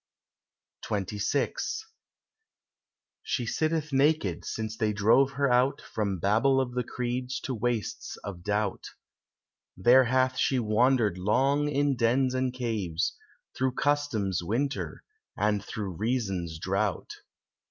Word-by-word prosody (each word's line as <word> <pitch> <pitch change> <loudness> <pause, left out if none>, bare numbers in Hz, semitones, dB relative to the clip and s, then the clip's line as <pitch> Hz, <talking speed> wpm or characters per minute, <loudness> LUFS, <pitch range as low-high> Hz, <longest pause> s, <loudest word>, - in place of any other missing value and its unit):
XXVI 100 +5 -1 1.7
She 125 - -2
sitteth 155 +3 -1
naked 135 - +2
since 110 -1 -4
they 110 -1 0
drove 115 +7 +4
her 140 +1 +1
out 125 +3 +3
From 100 -3 -3
Babel 110 +9 +3
of 125 -2 -1
the 125 0 -1
Creeds 125 +1 -3
to 130 - -3
wastes 115 -3 -3
of 95 -4 -7
Doubt; 105 +1 -1 0.9
There 125 +7 +6
hath 130 +1 +1
she 135 - +2
wandered 110 -3 +2
long 135 +9 +2
in 145 -1 +1
dens 125 +2 +2
and 130 0 0
caves, 110 -10 -2 0.4
Through 130 -1 0
Custom's 135 -11 0
winter, 125 +11 -2 0.3
and 105 -1 +1
through 100 -2 -5
Reason's 95 -8 -2
drought. 95 +3 -1
120 Hz, 115 wpm, -28 LUFS, 105-130 Hz, 1.7 s, There